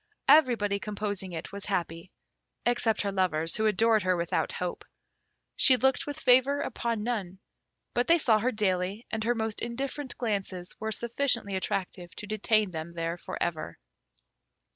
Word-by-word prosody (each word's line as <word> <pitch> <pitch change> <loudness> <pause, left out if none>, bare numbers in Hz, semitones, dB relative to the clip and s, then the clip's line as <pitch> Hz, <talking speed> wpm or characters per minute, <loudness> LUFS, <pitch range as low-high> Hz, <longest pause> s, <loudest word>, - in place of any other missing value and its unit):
Everybody 230 -9 +4
composing 205 -2 -4
it 160 -2 -6
was 200 0 -7
happy, 175 -3 -3 0.6
except 230 -3 +1
her 200 - -1
lovers, 165 -4 +1
who 220 0 +2
adored 220 +1 +3
her 185 -1 +1
without 170 0 -1
hope. 180 -1 -4 0.7
She 255 - +6
looked 265 +5 +1
with 290 - -5
favour 260 +3 +4
upon 235 -5 -2
none; 205 -6 -3 0.6
but 245 +1 +1
they 335 - +6
saw 230 -9 +3
her 250 +4 +1
daily, 195 0 -1
and 220 -1 -2
her 240 +1 +2
most 220 -2 -2
indifferent 260 +3 -4
glances 195 -6 -3
were 220 0 -3
sufficiently 235 -3 0
attractive 185 -2 -3
to - - -6
detain 215 -1 +1
them 160 0 -6
there 165 +1 -3
for - - -6
ever. 160 - -3
210 Hz, 155 wpm, -28 LUFS, 185-240 Hz, 0.7 s, She